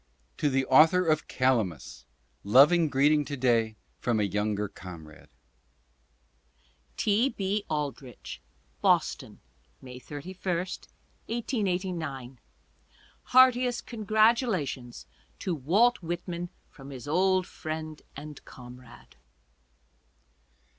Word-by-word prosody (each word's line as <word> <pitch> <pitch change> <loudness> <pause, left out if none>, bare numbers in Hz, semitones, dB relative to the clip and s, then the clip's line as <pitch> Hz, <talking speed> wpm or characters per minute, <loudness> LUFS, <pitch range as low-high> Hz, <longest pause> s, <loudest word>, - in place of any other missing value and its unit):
To 145 - +1
the 135 -1 +1
author 160 +7 +5
of 155 -1 +1
"Calamus," 110 - -1 0.4
loving 145 - +5
greeting 145 +2 +3
to 140 0 -5
day 115 -4 +2 0.2
from 120 -3 0
a - - +2
younger 105 +1 -1
comrade. 85 -6 -12 1.7
T. 220 +6 +2
B. 200 -2 -2
Aldrich: 145 -4 -5 0.4
Boston, - - +1 0.4
May 125 -1 -10
31, 150 +8 -9 0.2
1889. 180 - -4 0.9
Heartiest 250 -1 +4
congratulations 215 - 0 0.3
to 185 - -3
Walt 190 - +2
Whitman 175 +1 -4 0.2
from 135 0 -12
his 130 -1 -9
old 185 +3 +2
friend 155 -2 -6
and 150 0 -9
comrade. 125 - -14
150 Hz, 90 wpm, -28 LUFS, 125-185 Hz, 1.7 s, author